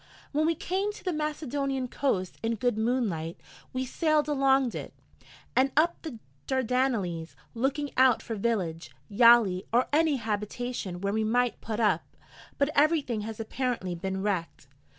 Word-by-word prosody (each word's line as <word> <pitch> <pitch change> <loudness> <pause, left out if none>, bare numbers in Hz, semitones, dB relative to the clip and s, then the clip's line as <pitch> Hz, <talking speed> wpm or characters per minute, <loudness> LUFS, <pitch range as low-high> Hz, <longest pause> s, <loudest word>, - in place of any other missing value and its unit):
When 305 +2 +1
we 330 - +2
came 385 +6 -1
to - - -13
the 365 - -1
Macedonian 285 -3 -2
coast 200 -9 -1
in 230 0 0
good 245 +1 0
moonlight, 220 -8 -1 0.3
we 260 0 -2
sailed 305 +2 +1
along 270 -3 +3
it, - - -7 0.6
and 265 +1 +3
up 335 +3 +3
the 305 -8 -7 0.3
Dardanelles, 240 -10 0 0.2
looking 275 +4 -1
out 255 -3 +5
for 230 - -5
village, 195 -7 -2 0.2
yali, 225 -4 +5
or 245 +2 +3
any 310 -1 +4
habitation 215 -3 -3
where 200 0 -1
we 220 0 +1
might 245 +2 +1
put 220 0 -4
up: 215 -3 +2 0.5
but 285 +1 +2
everything 285 -7 +2
has 220 +1 -6
apparently 225 -4 -2
been 190 +2 -3
wrecked. 180 -8 -2
245 Hz, 150 wpm, -28 LUFS, 210-275 Hz, 0.6 s, out